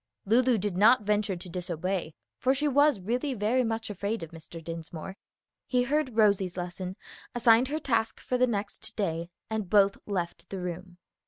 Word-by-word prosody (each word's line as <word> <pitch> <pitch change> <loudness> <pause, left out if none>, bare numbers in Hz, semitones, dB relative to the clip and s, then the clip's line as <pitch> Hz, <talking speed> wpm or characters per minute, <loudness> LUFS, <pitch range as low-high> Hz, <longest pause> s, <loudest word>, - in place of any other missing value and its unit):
Lulu 240 +3 +4
did 205 -2 -2
not 215 +3 +6
venture 210 -1 +1
to 175 +1 -8
disobey, 180 -1 -3 0.2
for 260 +2 +3
she 295 +2 +1
was 285 -3 +4
really 250 +8 -1
very 230 +4 +2
much 225 -1 -2
afraid 205 +1 -3
of 160 - -8
Mr. 165 0 -10
Dinsmore. 165 +2 -7 0.5
He 250 -1 +2
heard 270 -2 0
Rosie's 200 -4 +3
lesson, 180 +1 -4 0.4
assigned 235 +1 +5
her 300 +3 -2
task 230 -6 0
for 250 - -2
the 255 - +5
next 210 0 -4
day, 170 -4 -2 0.2
and 220 -4 -3
both 200 0 +4
left 180 -4 -3
the 195 - -5
room. 180 0 -6
205 Hz, 170 wpm, -28 LUFS, 180-240 Hz, 0.5 s, not